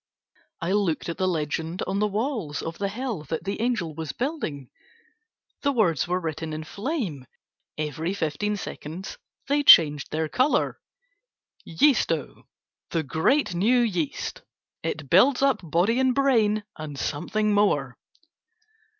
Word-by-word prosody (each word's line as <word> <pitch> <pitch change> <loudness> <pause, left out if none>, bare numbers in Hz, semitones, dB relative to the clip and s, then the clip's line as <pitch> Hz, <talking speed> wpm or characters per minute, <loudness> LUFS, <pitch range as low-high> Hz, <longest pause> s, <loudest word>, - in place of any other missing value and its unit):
I 170 - -1
looked 190 -6 0
at 170 - -5
the 185 - +2
legend 160 +1 -2
on 195 - -1
the 210 - +2
walls 210 - -2
of 165 0 -6
the 200 - 0
hell 230 -4 -4
that 160 +3 -4
the 200 +3 -3
angel 220 -10 -1
was 160 0 -5
building, 240 - -4 0.9
the 280 - +2
words 180 - +2
were 180 +1 0
written 160 -2 -4
in 155 +1 -4
flame, 200 - -4 0.5
every 160 +4 -2
fifteen 200 +5 -1
seconds 175 0 -7 0.3
they 285 +1 +2
changed 150 - +7
their 155 +1 -1
color, 255 - +1 0.9
"Yeasto, 165 - +1 0.4
the 165 - -1
great 175 - +1
new 225 +8 +3
yeast, 180 -10 -2 0.4
it 155 -2 -4
builds 250 - +5
up 275 -1 +3
body 180 - +1
and 260 -1 +2
brain, 225 -6 +3
and 150 -2 -7
something 210 +10 -1
more." 145 - +2
180 Hz, 135 wpm, -25 LUFS, 155-230 Hz, 0.9 s, changed